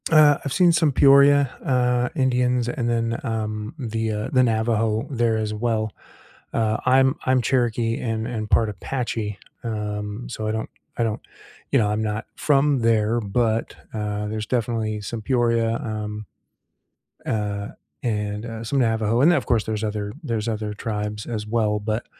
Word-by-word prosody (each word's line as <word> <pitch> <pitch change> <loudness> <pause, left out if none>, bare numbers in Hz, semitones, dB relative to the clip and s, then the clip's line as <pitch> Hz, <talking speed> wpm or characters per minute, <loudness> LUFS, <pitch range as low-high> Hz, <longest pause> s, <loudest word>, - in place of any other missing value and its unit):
Uh, 150 -3 +6
I've 140 - -3
seen 180 -2 +5
some 160 -3 +3
Peoria, 140 0 +6
uh, 125 -3 +2
Indians, 125 -2 +2
and 120 -2 -1
then, 115 0 0
um, 110 +1 -3
the, 115 -4 -2
uh, 105 0 -3
the 130 - +5
Navajo 110 -1 +1
there 120 -3 +1
as 110 -1 -2
well. 110 -1 -1 0.6
Uh, 110 -1 +1
I'm 130 +1 +4
I'm 130 -1 +3
Cherokee 120 -2 +1
and 115 -1 -2
and 110 -3 -4
part 115 - +4
Apache, 105 -1 -3 0.2
um, 105 0 -4
so 110 -2 -4
I - - +1
don't 110 0 -3 0.3
I 120 - +1
don't, 110 -2 -1 0.5
you 140 - +4
know, 105 - +2
I'm 105 +1 0
not 105 +1 -2
from 145 -1 +3
there, 115 0 +2
but, 110 +2 0 0.2
uh, 105 -1 -2
there's 110 0 -3
definitely 110 -3 -1
some 110 +2 -5
Peoria, 115 -2 +1
um, 105 -1 -4 1.0
uh, 100 -2 -2 0.4
and, 105 -1 -2
uh, 115 -1 -6
some 135 +5 -1
Navajo, 110 -1 +2
and 160 +6 +6
then - - +4
of - - -6
course 115 -5 +2
there's 110 -1 -3
other 105 -1 -3
there's 115 -7 -2
other 110 -2 -2
tribes 105 0 -4
as 110 -3 -4
well, 105 -2 +1
but, 110 +2 -2
115 Hz, 165 wpm, -23 LUFS, 105-125 Hz, 1.0 s, Uh